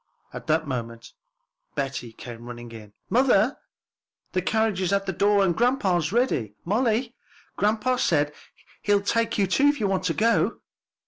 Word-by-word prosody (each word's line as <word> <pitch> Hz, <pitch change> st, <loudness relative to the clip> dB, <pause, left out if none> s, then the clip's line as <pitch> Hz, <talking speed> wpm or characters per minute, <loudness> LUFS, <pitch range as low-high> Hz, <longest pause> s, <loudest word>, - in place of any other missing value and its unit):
At -, -, -8 dB
that 160 Hz, +1 st, +2 dB
moment 115 Hz, -3 st, -5 dB, 0.6 s
Betty 130 Hz, -4 st, -3 dB
came 120 Hz, 0 st, -10 dB
running 120 Hz, -1 st, -8 dB
in. 105 Hz, -3 st, -11 dB
"Mother, 250 Hz, -1 st, +3 dB, 0.7 s
the 185 Hz, -, 0 dB
carriage 220 Hz, 0 st, 0 dB
is 185 Hz, -1 st, 0 dB
at 200 Hz, 0 st, +1 dB
the 190 Hz, -, -2 dB
door, 200 Hz, +2 st, +3 dB
and 175 Hz, -3 st, +1 dB
grandpa's 190 Hz, -, +1 dB
ready. 195 Hz, -, 0 dB
Molly, 230 Hz, +4 st, +1 dB, 0.4 s
grandpa 220 Hz, +4 st, +1 dB
says 150 Hz, -9 st, +2 dB, 0.5 s
he'll 205 Hz, -1 st, +2 dB
take 230 Hz, +2 st, 0 dB
you 200 Hz, -, +3 dB
too, 270 Hz, +10 st, +3 dB
if 290 Hz, 0 st, +2 dB
you 205 Hz, -, +1 dB
want 190 Hz, -1 st, -1 dB
to 165 Hz, -, 0 dB
go." 230 Hz, +1 st, +2 dB
195 Hz, 155 wpm, -25 LUFS, 140-225 Hz, 0.7 s, Mother